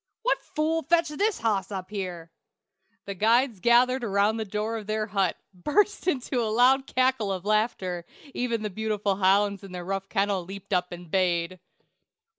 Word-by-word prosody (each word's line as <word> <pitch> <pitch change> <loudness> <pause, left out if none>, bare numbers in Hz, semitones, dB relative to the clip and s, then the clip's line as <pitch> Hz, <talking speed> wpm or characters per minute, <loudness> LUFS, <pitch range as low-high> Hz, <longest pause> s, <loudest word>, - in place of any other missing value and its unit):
"What - - +1
fool 320 +1 +1
fetched 325 -1 +1
his 430 0 +1
hoss 205 -4 0
up 190 0 -6
here?" 180 -5 -5 0.7
The 200 - -4
guides 225 +3 +2
gathered 245 +4 +4
about 205 0 +2
the 220 - -3
door 215 +3 -2
of 210 - -11
their 215 0 -1
hut, 195 -3 0 0.2
burst 340 - 0
into 255 -6 0
a 220 - -1
loud 255 +4 +4
cackle 255 -5 +1
of 185 -1 -4
laughter; 205 -5 0 0.3
even 235 -3 -1
the 210 - -3
beautiful 210 -1 -1
hounds 200 +1 +2
in 195 -2 -10
their 180 -1 -6
rough 195 +1 -3
kennel 195 -2 0
leaped 200 +2 -8
up 180 0 0
and 175 -2 -9
bayed. 180 -1 0
210 Hz, 170 wpm, -26 LUFS, 190-245 Hz, 0.7 s, gathered